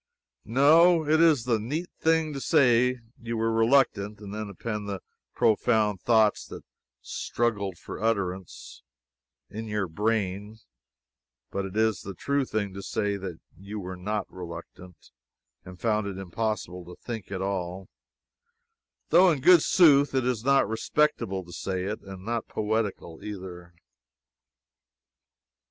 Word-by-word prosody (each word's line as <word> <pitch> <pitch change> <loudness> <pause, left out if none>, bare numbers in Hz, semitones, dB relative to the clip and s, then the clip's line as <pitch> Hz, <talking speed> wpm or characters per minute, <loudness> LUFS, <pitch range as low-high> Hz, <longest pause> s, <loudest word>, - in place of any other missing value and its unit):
No, 160 +8 +5
it 160 +2 +4
is 155 -8 +5
the 115 -2 +1
neat 150 +11 -4
thing 160 -1 +2
to 135 - -5
say 125 -5 +3 0.2
you 115 0 -4
were 115 0 +1
reluctant, 115 -3 +2
and 100 -1 -9
then 105 -1 -5
append 105 +1 -5
the 100 -1 -3 0.4
profound 110 -2 +2
thoughts 110 -3 +3
that - - -9 0.4
"struggled 100 -6 -2
for - - -9
utterance," 95 -5 -3 0.7
in 110 +2 -6
your 105 -3 -2
brain; 105 +2 -2 0.9
but 100 0 -2
it 95 +2 -6
is 110 -3 +2
the 100 -1 -8
true 140 +7 0
thing 105 -5 -2
to 100 - -7
say 100 0 -2 0.4
you 100 +3 -7
were 95 -1 -6
not 105 +4 -3
reluctant, 90 -1 -10 0.5
and 90 0 -12
found 110 -2 0
it 95 -2 -5
impossible 95 -1 -3
to 90 +1 -11
think 115 -5 -7
at 95 - -3
all 95 -1 -3 1.2
though 180 +2 +6
in 150 - -1
good 170 +4 +7
sooth 145 -6 +5
it 130 -2 +1
is 125 -3 -1
not 140 -2 +4
respectable 110 -4 0
to 85 - -12
say 95 0 -3
it, 105 +3 -4
and 95 -1 -10
not 115 0 -2
poetical, 105 -6 -3
either. 90 -4 -8
105 Hz, 140 wpm, -27 LUFS, 95-125 Hz, 1.2 s, good